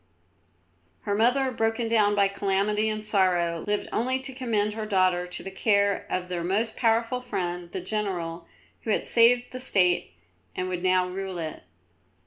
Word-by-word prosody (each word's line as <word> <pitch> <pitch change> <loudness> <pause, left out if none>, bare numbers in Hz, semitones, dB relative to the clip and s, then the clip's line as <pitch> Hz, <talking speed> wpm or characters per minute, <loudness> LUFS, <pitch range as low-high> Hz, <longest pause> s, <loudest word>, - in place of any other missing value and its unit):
Her 205 - -2
mother, 250 +5 +2
broken 225 0 0
down 210 -2 +3
by 200 -1 +4
calamity 200 +2 0
and 215 0 -4
sorrow, 175 -5 +1
lived 210 0 -1
only 255 +3 +1
to 270 0 -7
commend 220 -5 -1
her 215 0 -5
daughter 185 -3 +2
to 180 - -5
the 195 - -6
care 200 0 +1
of 180 0 -2
their 175 -2 -3
most 210 +6 0
powerful 230 +1 +1
friend, 175 -7 -4
the 190 - -4
general 180 -4 -3 0.3
who - - -6
had 215 - +1
saved 245 +1 +4
the 255 - -6
State 180 - +1 0.4
and 185 - -2
would 180 -1 -3
now 185 0 +2
rule 190 0 -5
it. 160 -2 -5
200 Hz, 165 wpm, -26 LUFS, 180-225 Hz, 0.4 s, by